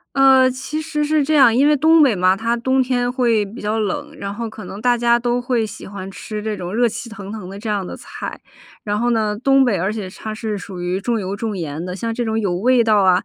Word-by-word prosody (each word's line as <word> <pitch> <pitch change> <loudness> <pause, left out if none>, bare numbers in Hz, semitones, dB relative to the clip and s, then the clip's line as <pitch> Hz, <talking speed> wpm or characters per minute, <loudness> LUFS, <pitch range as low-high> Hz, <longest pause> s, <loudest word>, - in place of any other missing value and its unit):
呃， 265 -1 +6
其 270 +4 -4
实 305 -1 -2
是 305 -1 +2
这 310 - -1
样， 260 -6 +6
因 275 - +4
为 300 - +5
东 315 +2 +5
北 255 -7 +4
嘛， 185 +1 +3
它 230 +3 0
冬 260 +2 +1
天 245 -1 0
会 235 -5 +1
比 215 +4 -10
较 215 +2 -1
冷， 290 +8 -3
然 200 0 -4
后 230 0 -4
可 220 0 -10
能 200 - -8
大 245 +2 +2
家 235 0 +3
都 240 +1 0
会 245 -2 0
喜 215 - -8
欢 195 -1 -7
吃 210 +2 -6
这 220 -1 -2
种 180 0 -6
热 240 +1 +3
气 230 +1 -4
腾 200 -2 -8
腾 210 -5 -7
的 195 +1 -8
这 220 +1 -4
样 200 -3 -1
的 - - -7
菜。 - - -7 0.5
然 205 0 -1
后 240 - +1
呢， 215 -3 +1
东 270 +2 +4
北 210 -7 +1
而 190 +4 0
且 210 -4 -5
它 215 +3 -7
是 215 -2 -3
属 180 -1 -8
于 180 +2 -1
重 230 +2 -1
油、 195 0 -3
重 215 -1 -3
盐 155 -2 -4
的， 180 +1 -5
像 230 +2 -3
这 240 -1 -2
种 220 0 0
有 200 -5 0
味 235 +5 +3
道 215 -2 +4
啊， 185 -1 +3
225 Hz, 285 characters per minute, -20 LUFS, 200-250 Hz, 0.5 s, 呃